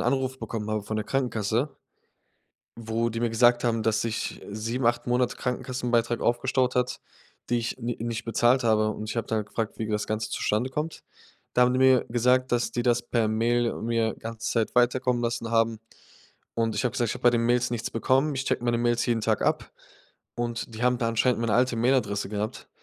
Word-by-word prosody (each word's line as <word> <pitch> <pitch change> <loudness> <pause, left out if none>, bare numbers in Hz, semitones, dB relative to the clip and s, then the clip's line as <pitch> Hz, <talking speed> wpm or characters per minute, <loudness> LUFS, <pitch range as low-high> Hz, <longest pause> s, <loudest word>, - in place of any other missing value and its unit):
Anruf 130 +1 0
bekommen 110 -4 -4
habe 110 -1 -1
von 110 +2 -4
der 110 - -2
Krankenkasse, 120 +1 -1 1.0
wo 115 0 -1
die 115 - -4
mir 120 - +1
gesagt 120 +1 +4
haben, 115 -2 +1
dass 110 -1 +1
sich, 115 -1 -3
äh, 100 - -9
7, 115 +4 -2
8 120 +1 +1
Monate 125 0 +1
Krankenkassenbeitrag 120 -2 -1
aufgestaut 125 +1 +1
hat, 125 0 0 0.5
die 120 - +2
ich 115 - -3
n 115 - -7
nicht 115 -1 -3
bezahlt 120 +2 +3
habe, 110 -2 +3
und 110 0 -6
ich - - -4
habe 115 - -1
dann 110 -2 -1
gefragt, 110 +1 -4
wie 110 - -2
das 105 -1 -1
Ganze 110 -1 -2
zustande 110 +5 0
kommt. 150 +4 -4 0.5
Da 125 - +5
haben 125 0 +3
die 130 - +1
mir 130 -2 +5
gesagt, 125 +2 +2
dass 120 -1 +1
die 120 - -2
das 120 -1 +2
per 115 -3 0
Mail 115 +2 +1
mir 115 -1 0
ganze 115 0 -5
Zeit 115 0 0
weiterkommen 125 0 +2
lassen 115 -1 -2
haben, 115 -1 +2 0.8
und 115 -1 0
ich - - -1
habe 125 - +1
gesagt: 120 - 0
„Ich - - -2
habe - - -10
bei 120 - +6
den 115 -1 +1
Mails 120 0 +2
nichts 115 -2 -3
bekommen.“ 135 +5 +1
Ich 130 - -2
checke - - -1
meine 120 -1 +2
Mails 120 0 +1
jeden 115 -2 +1
Tag - - +1
ab - - 0 0.6
und 120 -1 -3
die 110 - -6
haben 125 0 +3
da 115 - 0
anscheinend 115 +2 +2
meine 115 -3 +1
alte 125 0 +2
Mailadresse 115 -5 +1
gehabt. 105 +1 -4
120 Hz, 210 wpm, -26 LUFS, 115-125 Hz, 1.0 s, bei